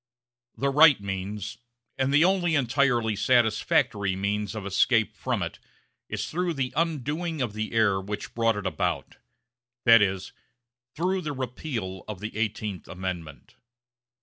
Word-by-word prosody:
The 140 0 +1
right 150 -2 +7
means, 100 +3 -5 0.4
and 135 0 0
the 145 +4 +5
only 180 -3 +2
entirely 125 -4 +2
satisfactory 105 -4 +2
means, 100 +2 -2
of 105 -3 -5
escape 110 +3 +2
from - - -2
it - - -6 0.5
is - - -3
through 175 0 -2
the 130 -2 -2
undoing 160 +1 -1
of 120 -6 -1
the 110 0 -3
error 100 -4 +3
which 105 +2 -6
brought 115 -1 +2
it 105 - -5
about 95 - -2 0.7
that 115 -1 +8
is, 95 -1 -1 0.6
through 185 +4 0
the 150 -3 -3
repeal 120 - -4
of 105 -3 -6
the 105 +2 -6
Eighteenth 105 -3 -3
Amendment. 90 -5 -6
115 Hz, 140 wpm, -26 LUFS, 100-140 Hz, 0.7 s, that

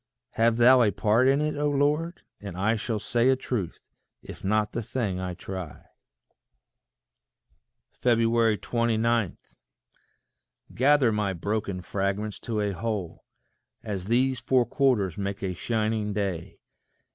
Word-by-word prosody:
Have 115 0 +2
thou 125 +2 +7
a 110 - +4
part 110 +5 +2
in 135 +2 +3
it, 150 0 -1
O 145 0 0
Lord, 150 +4 0 0.2
and 100 -4 -8
I 105 +4 +2
Shall 110 +1 -2
say 120 +4 +1
a 130 - +5
truth, 120 -8 -4 0.4
if - - -11
not 105 +1 +1
the 120 - -3
thing 110 -5 -3
I 90 -1 -4
try. 95 -3 -7 2.2
29. 115 -2 +1 1.4
Gather 135 -2 +4
my 105 -2 0
broken 100 0 -3
fragments 100 +3 -2
to 110 -3 -3
a 105 -1 0
whole, 100 -2 -4 0.6
As 95 -3 -5
these 130 +2 +2
four 125 +1 +2
quarters 115 - +1
make 100 +1 -4
a 95 -1 -1
shining 110 +1 -1
day. 95 -5 -3
110 Hz, 125 wpm, -26 LUFS, 100-120 Hz, 2.2 s, thou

